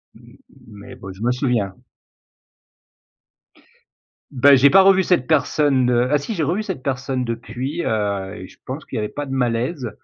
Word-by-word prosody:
Mmh, - - -18 0.3
mais 105 -2 -12
bon 95 - -10
je 95 - -15
me 120 - +1
souviens. 125 -7 -1 2.6
Beh, 140 +1 +5
j'ai 140 +2 +6
pas 195 +1 +7
revu 190 -1 +5
cette 175 -10 +1
personne, 140 -3 +2
heu 120 +1 +2
ah 150 - +4
si 145 +11 -5
j'ai 175 - -3
revu 175 +9 -1
cette 190 -10 -5
personne 130 -1 -2
depuis, 120 +7 -4
heu, 100 -2 -2
et 95 -3 -9
je - - -19
pense 135 +4 -6
qu'il - - -9
y - - -1
avait 105 - -2
pas 145 - -5
de 135 - -7
malaise. 125 +2 -1
130 Hz, 180 wpm, -20 LUFS, 115-145 Hz, 2.6 s, pas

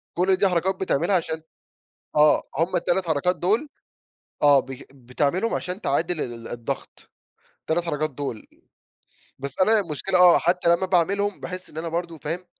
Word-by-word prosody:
كل 185 +2 +2
دي 195 - +3
حركات 185 +1 0
بتعملها 185 0 +1
عشان 160 -2 -2 0.7
آه، 150 0 +5 0.2
همُ 165 +4 0
ال3 175 +1 0
حركات 160 +3 +1
دول 215 - 0 0.7
آه، 145 -2 +6
ب 135 0 -9
بتعملهُم 140 - -1
عشان 180 +2 -4
تعادل 165 0 0
ال 115 -3 -5
الضَّغط، 120 -1 -6 0.5
ال3 170 +2 -1
حركات 155 -1 -1
دول. 135 -5 -6 0.9
بس، 140 0 -7
أنا 220 +3 +4
المشكلة 185 +1 -1
آه، 180 -1 +8
حتى 175 0 +1
لمّا 190 - -2
باعملهم 195 +3 +1
باحِس 185 0 -7
إن - - -14
أنا 165 +1 -3
برضه 170 0 -4
فاهم؟ 165 +4 -4
170 Hz, 150 wpm, -24 LUFS, 150-185 Hz, 0.9 s, آه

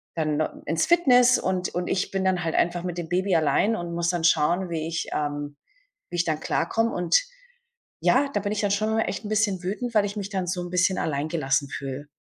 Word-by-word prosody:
dann 155 -2 0
no 155 - +1 0.2
ins 165 0 0
Fitness, 250 -8 +5
und 185 -1 -1
und 180 0 -1
ich 185 - -1
bin 195 -1 -2
dann 185 -2 +1
halt 160 - -2
einfach 175 0 +1
mit 180 -1 -4
dem 170 -2 -4
Baby 185 +1 +1
allein 165 +7 +2
und 175 -4 -5
muss 170 0 0
dann 175 -2 -1
schauen, 170 +3 +2
wie 160 -1 -2
ich 165 0 -3
ähm, 145 -1 -3 0.5
wie 175 - -6
ich 170 - +1
dann 155 -2 -1
klarkomme 225 +7 0
und, 175 -1 +3 0.8
ja, 280 +2 +3
da - - +1
bin 205 +1 -2
ich 210 - -1
dann 205 -2 0
schon 215 +2 +1
mal 225 - +2
echt - - -4
'n - - -5
bisschen 210 -4 +1
wütend, 225 +6 -3
weil 210 -1 +4
ich 205 +1 -5
mich 200 -1 -4
dann 190 -2 -2
so 180 0 -2
'n 175 0 -6
bisschen 185 +1 +2
alleingelassen 140 -2 -1
fühle. 135 +1 -6
180 Hz, 230 wpm, -25 LUFS, 160-205 Hz, 0.8 s, Fitness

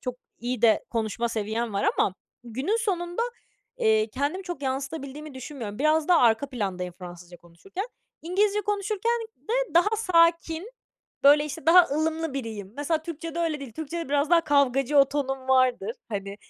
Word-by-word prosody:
çok 250 -1 -4 0.2
iyi 240 0 -3
de 225 -2 +4
konuşma 230 +1 -1
seviyem 220 +1 -2
var 200 - +2
ama 185 - +2 0.3
günün 260 - -1
sonunda, 355 -2 -1 0.6
eee, 220 0 +3
kendimi 285 - -2
çok 350 -6 -6
yansıtabildiğimi 275 +2 -4
düşünmüyorum. 250 -6 -7
Biraz 305 +2 +2
daha 355 -2 +6
arka 235 +3 +3
plandayım 185 -7 -3
Fransızca 175 -1 -10
konuşurken. 265 - -8 0.4
İngilizce 400 +5 +1
konuşurken 415 +3 -1 0.2
de - - -2
daha 415 +6 +4
sakin, 335 -1 +2 0.5
böyle, 295 +1 +7
işte, 295 -1 -7
daha 355 +2 +8
ılımlı 320 -1 -1
biriyim. 220 -6 -5
Mesela 310 +2 -1
Türkçede 330 0 -6
öyle 325 -3 -1
değil. 270 -5 -8
Türkçede 320 +4 -5
biraz 290 +1 +1
daha 345 -1 +6
kavgacı 280 -1 +3
o 275 -1 +6
tonum 270 -2 -3
vardır, 255 -5 +2
hani, 200 -2 -5
285 Hz, 155 wpm, -26 LUFS, 235-335 Hz, 0.6 s, daha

